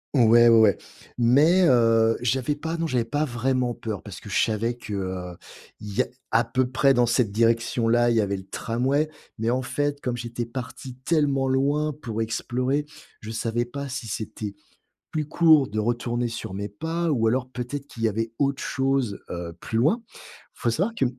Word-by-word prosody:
ouais, 120 -1 +6
ouais. 110 -3 +6 0.4
Mais 145 +10 +5
heu, 115 -2 +4
j'avais 130 +4 0
pas 160 +3 -4
non, 165 0 -1
j'avais 125 -5 +1
pas 145 +6 -1
vraiment 125 -1 0
peur. 110 -5 -5
Parce - - -10
que - - -10
je - - +2
savais 115 +2 -1
que 95 -5 -5 0.5
il 105 -1 -7
y - - +5
a - - -2 0.2
à 115 +1 +3
peu 130 +2 +1
près 135 0 +4
dans 120 -1 +3
cette 120 -3 +1
direction-là, 115 +1 +2
il - - +2
y 110 - +4
avait 100 -1 -1
le 95 0 -11
tramway. 135 +7 0 0.3
Mais 115 +1 0
en 130 +2 +1
fait, 145 +2 -2
comme 125 -3 -2
j'étais 120 0 -4
parti 125 +1 -7
tellement 140 -5 +1
loin 145 +3 +1
pour 115 -1 -3
explorer, 130 +5 -1 0.3
je 110 +1 -8
savais 115 +1 -1
pas 140 +2 -6
si 125 -3 -5
c'était, 105 -1 -5 0.6
plus 155 -2 -2
court 160 -5 +5
de 110 +1 -4
retourner 120 +2 -1
sur 115 -5 -5
mes 100 +1 -4
pas 165 +10 -3
ou 115 -4 +2
alors 125 +2 0
peut-être 130 +3 -5
qu'il 115 - -9
y 110 - +4
avait 115 +2 -2
autre 140 -1 +1
chose, 135 -5 -1
heu, 85 -1 -5
plus 110 - -2
loin. 185 - +2
Il - - -18 0.4
faut 120 - -1
savoir 190 - 0
que - - +3
120 Hz, 190 wpm, -25 LUFS, 115-135 Hz, 0.6 s, ouais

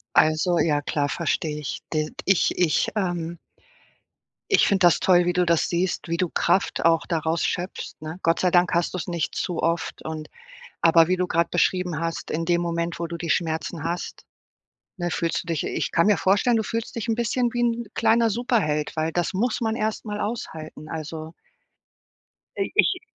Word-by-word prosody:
Also, 155 +3 +3
ja, 150 -2 +2
klar, 145 0 -1
verstehe 155 -2 -1
ich. 145 - -5
D 155 -1 0 0.2
ich 195 -2 +2
ich, 175 -4 +2
ähm 175 -3 -2 1.1
ich 395 - +5
finde 190 -3 +2
das 170 - +2
toll, 180 -2 +4
wie 175 - +2
du 180 -1 +1
das 170 -1 +2
siehst, 175 0 -1
wie 170 - 0
du 180 +1 0
Kraft 195 - +1
auch 165 -1 +3
daraus 165 0 0
schöpfst, 180 +1 -4
ne? 155 +3 -6
Gott 165 0 +2
sei 180 - +3
Dank 175 -1 +3
hast 170 0 +1
du's 180 - -3
nicht 170 -4 -3
zu 175 - -2
oft 170 0 -1
und 155 -1 -5 0.5
aber 165 0 +5
wie 185 - +2
du 180 0 0
gerade 170 -1 +1
beschrieben 180 -1 +1
hast, 165 -1 -4
in 165 +2 -1
dem 170 0 +2
Moment, 170 0 -2
wo 170 - -2
du 170 - -5
die 170 0 -5
Schmerzen 160 -1 -1
hast, 170 +2 -4 0.7
ne, 175 -3 -3
fühlst 165 -1 -1
du 175 - -20
dich 165 -3 -1
ich - - -2
kann 170 +3 +3
mir 210 - +5
vorstellen, 200 +5 +3
du 220 - +1
fühlst 225 +1 -4
dich 230 0 -3
'n 225 - +2
bisschen 240 +1 0
wie 240 - -2
'n 235 0 0
kleiner 225 +1 +3
Superheld, 205 -10 0
weil 160 0 0
das 175 +2 -1
muss 230 +5 0
man 225 -1 0
erstmal 215 -2 -3
aushalten, 160 -9 -5
also. 160 0 -6 1.3
I-ich 370 - +2
170 Hz, 185 wpm, -24 LUFS, 165-195 Hz, 1.3 s, ich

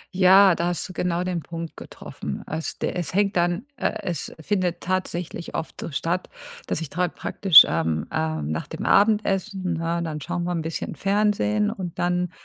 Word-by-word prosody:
Ja, 190 0 +7
da 170 +1 -1
hast 175 +1 -2
du 185 - -10
genau 175 0 -1
den 180 -2 -2
Punkt 165 +1 -7
getroffen. - - -7
Als 160 +1 -4
d - - -2
es 180 0 -4
hängt 200 -1 +2
dann, 175 +6 +1
äh 220 - -1
es 175 -6 -3
findet 180 0 -1
tatsächlich 180 -2 -3
oft 160 - -4
so - - -4
statt, 170 +5 -2 0.4
dass 165 - -2
ich 155 - -6
da 180 0 +1
praktisch, 175 0 +6
ähm, 80 -1 -1
ähm 80 -1 -2
nach 80 - -3
dem - - -6
Abendessen, 200 -3 +2
ne, 165 +1 -1
dann 155 -2 -4
schauen 175 +2 -3
wir 180 - -2
'n 170 -2 -1
bisschen 160 0 -4
Fernsehen 210 +1 +1
und 185 -6 -6
dann 180 0 0
175 Hz, 185 wpm, -24 LUFS, 165-190 Hz, 0.4 s, Ja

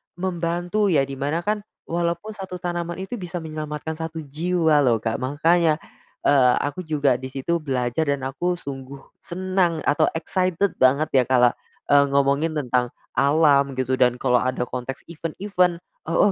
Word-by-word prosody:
membantu, 175 +3 -1
ya, 155 -7 +3
di 135 0 -6
mana, 150 +5 -1
kan, 210 +2 0 0.2
walaupun 170 +4 -2
1 190 -3 -7
tanaman 175 -1 -3
itu 235 +4 -6
bisa 175 -2 -5
menyelamatkan 155 0 -5
1 160 0 -5
jiwa, 160 +1 +1
lho, 125 -5 +4
Kak. 115 -1 -1
Makanya, 155 +5 +2 0.5
eee, 130 -3 +5
aku 160 +4 -4
juga 140 -5 +2
di 130 - -6
situ 135 +6 -2
belajar 130 0 -1
dan 140 -2 0
aku 145 +7 -1
sungguh 135 -3 -8 0.2
senang 185 -2 -1
atau 155 +2 +3
excited 185 +3 0
banget, 140 +4 +3
ya, 130 -2 +4
kalau, 125 -2 +5 0.4
eee, 145 0 +7
ngomongin 140 +3 +2
tentang 125 -4 0 0.2
alam, 140 -2 +3
gitu, 130 0 -1
dan 125 -1 +4
kalau 125 -1 +2
ada 130 0 -1
konteks 125 +2 -5
event-event, 175 +2 -1 0.2
"Oh 185 +5 +3
155 Hz, 155 wpm, -23 LUFS, 135-175 Hz, 0.5 s, eee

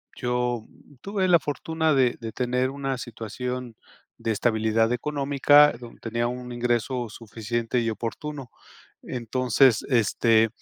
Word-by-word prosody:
yo 125 -2 -1 0.4
tuve 195 -1 -1
la 175 -2 +6
fortuna 160 +2 -1
de 130 -3 +3
de 115 -1 -6
tener 125 +2 0
una 135 -1 -3
situación 120 +1 -5 0.4
de - - -4
estabilidad 110 +1 +1
económica, 145 +2 +4
donde 120 -1 -12
tenía 115 +1 -1
un 125 0 -6
ingreso 120 0 -1
suficiente 115 +2 -3
y 115 - 0
oportuno. 130 +4 -5 0.5
Entonces, 125 0 +2
este, 115 -1 +3
125 Hz, 120 wpm, -25 LUFS, 115-135 Hz, 0.5 s, la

